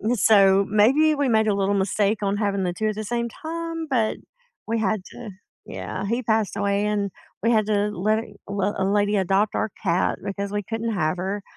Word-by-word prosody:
So, 195 -2 +5
maybe 270 +10 +4
we 285 -1 0
made 220 -1 +3
a 205 - +3
little 200 0 +1
mistake 200 +2 +1
on 200 +1 0
having 200 -2 0
the 180 - 0
2 215 +3 -2
at 215 - -1
the 215 - -4
same 235 +1 -1
time, 330 +4 -5
but 230 -5 +1 0.5
we 230 0 0
had 215 -1 0
to 230 -4 -9 0.3
Yeah, - - -5
he 235 +4 -1
passed 220 -2 0
away, 200 0 0
and 205 -2 -1 0.3
we 230 - +3
had 215 -2 +2
a 205 0 +1
la 210 +3 0
a - - -4 0.3
l 200 0 -1
a 190 - 0
lady 205 +1 +2
adopt 195 +3 +1
our 220 - 0
cat 180 -1 +1
because 200 0 -4
we 205 - -1
couldn't 225 +2 -3
have 155 -1 0
her, 195 +2 -3
205 Hz, 210 wpm, -23 LUFS, 200-225 Hz, 0.5 s, So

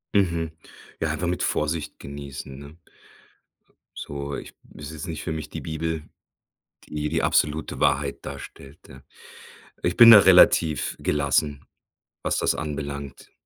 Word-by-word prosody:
Mhm. 85 -5 +1 0.5
Ja, - - 0
einfach 90 - -2
mit 90 +1 -1
Vorsicht 75 +1 -2
genießen, 70 -1 -8
ne? 70 +3 -12 1.2
So 70 0 -5
ich - - -9 0.2
ist 75 +1 -8
jetzt 80 +1 -7
nicht 80 -3 -5
für 80 - -3
mich 80 -1 -5
die - - -7
Bibel, 80 0 -3 0.8
die 75 0 -4
die - - -1
absolute 75 +1 0
Wahrheit 70 0 0
darstellt, 70 +1 -10
ja? 65 0 -14 0.8
Ich 85 +1 0
bin 115 -1 +10
da 110 - +12
relativ 80 -5 +5
gelassen, 70 0 0 0.6
was - - 0
das - - +1
anbelangt. 70 -2 -6
75 Hz, 135 wpm, -24 LUFS, 70-80 Hz, 1.2 s, da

